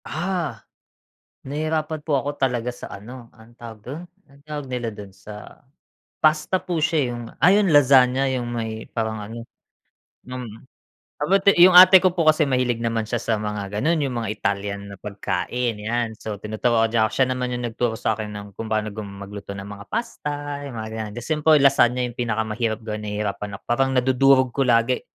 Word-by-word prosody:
Ah! 165 - -3 0.8
Nahihirapan 155 +2 -2
po 150 -1 0
ako 145 +2 -5
talaga 125 -2 0
sa 120 - -10
ano, 120 +4 -11
anong 115 +1 -18
tawag 115 -2 -10
do'n? 145 +7 -7 0.3
Ang 140 0 -21
tawag 150 -2 -5
nila 125 -2 -3
do'n 100 -2 -10
sa 105 +2 -12 0.6
pasta 155 +4 +2
po 175 -3 -3
siya 165 +1 +1
eh. - - -2
Yung 120 0 -6
ah, 165 +7 +5
yung 205 -2 +3
lasagna, 135 -3 +5
yung 120 -2 -3
may 110 -2 -5
parang 110 -2 -3
ano 115 +3 -8 0.8
mm. 125 -4 -8 0.5
About 195 +7 +1
yung 175 +2 +8
ate 185 0 +9
ko 185 - +4
po 170 -3 -1
kasi 155 0 +5
mahilig 125 -4 0
naman 115 -1 -1
siya 120 +1 -1
sa 115 - +1
mga 105 -1 -4
gano'n, 160 +3 +1
yung 130 -3 -2
mga 115 -2 -3
Italyan 100 -1 -2
na - - -8
pagkain, 105 +3 -3
yan. 115 +2 -1
So, 110 -1 -5
tinuturuan 110 +2 0
niya 110 -1 +3
'ko, - - -12
siya 130 - +3
naman 125 -1 -2
'yung 120 - -4
nagturo 120 0 -1
sa 110 0 -1
akin 105 -1 -5
ng 100 0 -7
kung 110 +3 -7
paano 110 -1 -1
gum 105 0 -7
magluto 100 0 -8
ng 95 - -7
mga 100 0 -9
pasta, 145 -10 -4
yung 130 - -8
mga 110 -1 -5
ganyan. 110 -2 -5
The 120 - -6
simple 155 +2 +3
lasagna 135 -3 +4
yung 120 0 -5
pinakamahirap 110 -1 -1
gawin, 110 -1 -4
nahihirapan 105 -1 -3
ako. - - -13
Parang 135 +2 0
nadudurog 130 0 +4
ko 135 +1 0
lagi. 115 +1 +3
120 Hz, 190 wpm, -23 LUFS, 110-140 Hz, 0.8 s, ate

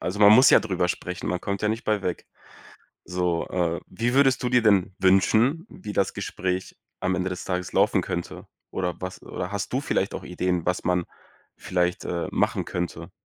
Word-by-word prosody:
also, 95 +3 -3
man 105 0 +8
muss 130 +5 +8
ja - - +8
drüber 95 -4 -1
sprechen, 90 0 -4
man 90 - -1
kommt 100 +1 -3
ja 105 - +2
nicht 110 +2 -2
bei 105 -2 0
weg. 90 - -3 0.8
So, 90 -2 -1
äh, 85 -2 -1
wie 120 +2 -2
würdest 135 -2 +4
du 125 - 0
dir 125 -1 +4
denn 100 -3 +3
wünschen, 110 - +3
wie 105 - -8
das 95 -1 0
Gespräch 95 -2 -3 0.2
am 95 0 +1
Ende 95 +1 -1
des 90 - -5
Tages 90 -1 -3
laufen - - +3
könnte? 85 0 -5 0.2
Oder 90 -2 -3
was 95 0 -6
oder 90 - -5
hast 100 +4 -4
du 135 - +1
vielleicht 95 -8 -1
auch - - -6
Ideen, 90 -1 -1
was 90 0 0
man 90 -1 +2 0.5
vielleicht, 90 -1 -1
äh, 85 -1 -2
machen - - +1
könnte? 85 -2 -4
95 Hz, 195 wpm, -25 LUFS, 90-105 Hz, 0.8 s, man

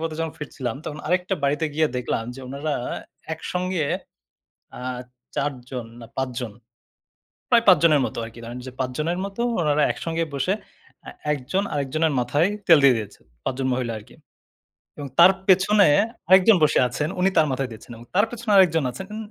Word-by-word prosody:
পথে 160 -1 -3
যখন 165 -1 -2
ফিরছিলাম, 130 -5 -5
তখন 150 - -6
আরেকটা 180 +3 +1
বাড়িতে 145 +3 +1
গিয়ে 155 +1 +3
দেখলাম 120 -2 -2
যে 135 - -10
উনারা 140 +3 -3 0.6
একসঙ্গে 180 0 -2 0.9
আ - - -9 0.6
৪ 145 +1 0 0.2
জন 125 -3 -5 0.2
না - - -8
৫ 130 -1 0
জন। 120 -4 -5 1.0
প্রায় 235 -2 +5
৫ 185 - +8
জনের 155 -4 +5
মতো - - -6
আরকি। 115 +1 -11
ধরেন 120 +2 -7
যে - - -6
৫ 130 -1 -1
জনের 170 +4 -1
মতো 200 +3 -5 0.2
উনারা 150 -1 +2
একসঙ্গে 165 0 -2
বসে 140 +7 0 0.5
এ্যা - - -9 0.2
একজন 150 +8 -2
আরেকজনের 150 +2 0
মাথায় 145 +7 +2 0.2
তেল 165 - +8
দিয়ে 135 -3 +7
দিয়েছে। 105 -2 -7 0.2
৫ - - -1
জন 130 - 0
মহিলা 125 -2 -2
আরকি। 105 - -17 0.8
এবং 145 -1 -5
তার 175 +2 +9 0.2
পেছনে 195 +2 +5 0.4
আরেকজন 190 +3 +7
বসে 150 - +4
আছেন, 150 +5 -2
উনি 185 +1 +4
তার 155 -1 +5
মাথায় 130 0 -2
দিচ্ছেন। 110 - -13
এবং 120 - -13
তার 205 +3 +5
পেছনে 235 -2 -4
আরেকজন 165 -5 +5
আছেন 130 +10 -8
উন - - -5
150 Hz, 175 wpm, -23 LUFS, 130-180 Hz, 1.0 s, তার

